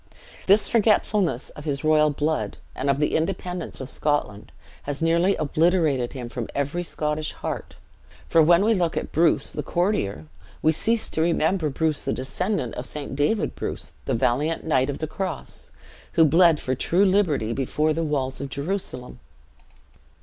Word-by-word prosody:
This 200 +3 +5
forgetfulness 210 - +2
of 150 - -11
his 145 -1 -2
royal 155 -1 +4
blood, 150 +2 -2 0.2
and 135 +2 -2
of 140 0 +2
the 150 - +1
independence 180 +1 -3
of 130 - -6
Scotland, 135 -8 -2 0.4
has 145 - -2
nearly 170 +4 +2
obliterated 155 -4 +1
him 125 -3 -6
from 120 -1 -5
every 140 +5 -1
Scottish 155 -2 -2
heart; - - -6 0.5
for, 165 - +4
when 170 +5 +5
we 225 - +4
look 175 -5 0
at - - -3
Bruce 160 -4 +2
the 150 - -3
courtier, 145 - -1 0.4
we 155 - +5
cease 225 +8 +1
to 160 - -1
remember 165 0 +1
Bruce 155 +2 -1
the - - -1
descendant 135 - -2
of 125 - -2
St. 145 -2 -5
David 145 - +1
Bruce 65 - -5
the - - 0
valiant 145 +8 0
knight 135 -4 +1
of 140 - -3
the 155 - -3
Cross, 170 0 -5 0.4
who 165 - +5
bled 165 +1 +5
for 130 - -2
true 175 +9 +2
liberty 170 - +2
before 150 +5 0
the 165 - -2
walls 135 -4 -2
of 140 - -4
Jerusalem. 140 -3 -4
155 Hz, 165 wpm, -24 LUFS, 140-175 Hz, 0.5 s, This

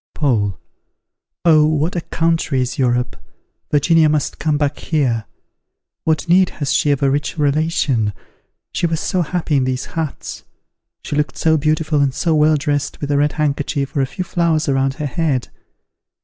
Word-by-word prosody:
Paul. 110 - 0 0.9
Oh, 155 -3 +6
what 155 +3 0
a 175 - -1
country 165 -5 0
is 125 +1 -2
Europe! 125 -1 +1 0.5
Virginia 155 +1 +4
must 150 -2 -1
come 155 -2 +1
back 145 -1 -1
here. 125 -9 0 0.8
What 160 +2 +1
need 185 +1 +4
has 145 -3 -1
she 150 - +2
of 140 -1 +1
a 135 - +3
rich 145 +3 -2
relation? 145 -7 +1 0.6
She 175 - +1
was 165 -1 -1
so 185 - 0
happy 165 -2 -1
in 135 - +2
these 130 0 -2
huts; 160 -3 -4 0.6
she - - -4
looked 150 -2 -1
so 160 -1 +3
beautiful 155 0 +1
and 135 -2 +1
so 165 - +1
well 155 0 +4
dressed 145 -1 -2
with 145 0 -3
a 145 - +2
red 145 0 +2
handkerchief 145 -2 -1
or 140 - +2
a 135 - 0
few 185 +7 -4
flowers 165 -3 +1
around 135 -1 +1
her 150 - -4
head! 145 -3 -1
150 Hz, 170 wpm, -19 LUFS, 135-160 Hz, 0.9 s, Oh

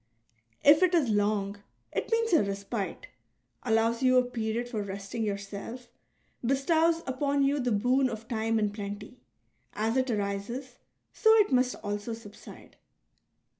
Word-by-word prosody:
If 295 +3 +7
it 365 -1 +4
is 295 -8 +2
long, 205 -1 0 0.3
it - - -3
means 455 -1 +1
a 325 - +6
respite, 200 - -4 0.6
allows 225 0 +1
you 255 -1 +4
a 250 - +5
period 235 0 -2
for 230 -4 -3
resting 200 +3 -5
yourself, 205 +4 -5 0.5
bestows 320 +6 +2
upon 280 +2 0
you 280 +1 +2
the 245 -2 0
boon 250 +5 +2
of 225 -1 -7
time 225 -1 0
in 210 -2 +1
plenty; 205 +3 -7 0.5
as 225 +4 0
it 260 0 +1
arises, 215 +4 -3 0.3
so 440 - +4
it 425 -6 +4
must 255 0 +2
also 205 +2 -3
subside. 215 -2 -13
230 Hz, 140 wpm, -29 LUFS, 205-265 Hz, 0.6 s, If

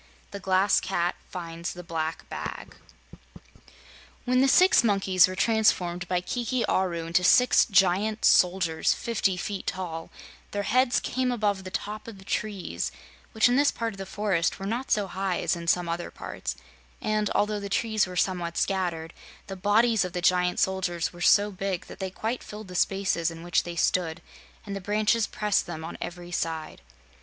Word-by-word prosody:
The 200 - -6
Glass 190 +1 +3
Cat 175 -2 -1 0.2
Finds 170 -1 -5
the 180 - -9
Black 165 -1 -4
Bag - - -7 1.5
When 255 +1 +3
the 270 - +4
six 365 +2 +6
monkeys 195 -4 +4
were 185 - -5
transformed 180 -5 +1
by 180 -1 0
Kiki 240 +5 -1
Aru 175 -3 0
into 170 +2 +1
six 250 +7 +5
giant 200 +2 +2
soldiers 180 -3 +3
fifty 195 -5 -1
feet 195 +2 -5
tall, 165 -3 -4 0.4
their 205 0 -1
heads 255 +3 +3
came 255 0 -1
above 205 -5 0
the - - -5
top 210 +3 -5
of 225 -3 -9
the 190 - -15
trees, 205 -3 -3 0.4
which 220 +1 +4
in 245 +1 +2
this 285 +1 +4
part 230 -1 -3
of 195 - -13
the 195 - -6
forest 195 -5 0
were 195 - -6
not 235 +6 -3
so 205 -1 +2
high 190 -1 -2
as - - 0
in 170 0 -7
some 175 0 +2
other 170 +1 -3
parts; - - -6 0.4
and, 215 -1 0
although 210 0 +1
the 200 0 -6
trees 215 0 +1
were 180 - -8
somewhat 175 -2 -1
scattered, 175 -4 -1 0.3
the 195 - -7
bodies 215 +3 +3
of 180 -1 -5
the 180 - -2
giant 180 0 +2
soldiers 180 -3 0
were 175 - -11
so 205 +3 +5
big 195 -2 -3
that - - -12
they 190 -1 -3
quite 225 +6 -3
filled 210 -2 -9
the - - -8
spaces 190 -2 +1
in 165 0 -9
which 175 -1 +2
they 175 -1 -7
stood 170 0 0 0.5
and 200 -1 -5
the 195 - -5
branches 210 +3 +1
pressed 210 -1 0
them 160 - -6
on 165 - -7
every 175 0 -7
side. 160 - -3
190 Hz, 180 wpm, -27 LUFS, 175-210 Hz, 1.5 s, six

